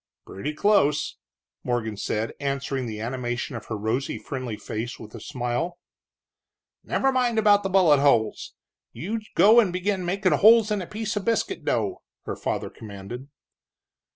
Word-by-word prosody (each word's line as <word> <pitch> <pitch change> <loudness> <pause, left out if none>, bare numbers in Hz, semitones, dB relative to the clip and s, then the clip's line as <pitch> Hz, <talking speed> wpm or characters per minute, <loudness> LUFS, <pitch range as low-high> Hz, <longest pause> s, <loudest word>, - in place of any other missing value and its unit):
"Pretty 125 +11 -5
close," 150 -7 +2 0.5
Morgan 115 -3 -1
said, 110 +2 -2
answering 140 -2 -2
the 110 -2 -5
animation 120 +2 -3
of 115 - -7
her 110 - -3
rosy, 115 +6 -1
friendly 130 -5 -5
face 115 +3 -5
with 110 -1 -11
a 115 - -8
smile. 130 +7 -3 1.1
"Never 270 - +1
mind 250 -3 +1
about 205 -2 +4
bullet 175 -7 +5
holes 120 -6 +2 0.4
you 215 +7 -4 0.2
go 220 +4 +7
and 210 -6 +3
begin 185 +1 -1
makin' 185 +1 +1
holes 220 0 +6
in 210 -2 0
a 175 - -6
piece 215 0 -3
of 205 - -3
biscuit 230 -1 0
dough," - - -1 0.2
her - - -4
father - - -3
commanded. 110 +5 -9
145 Hz, 150 wpm, -25 LUFS, -, 1.1 s, go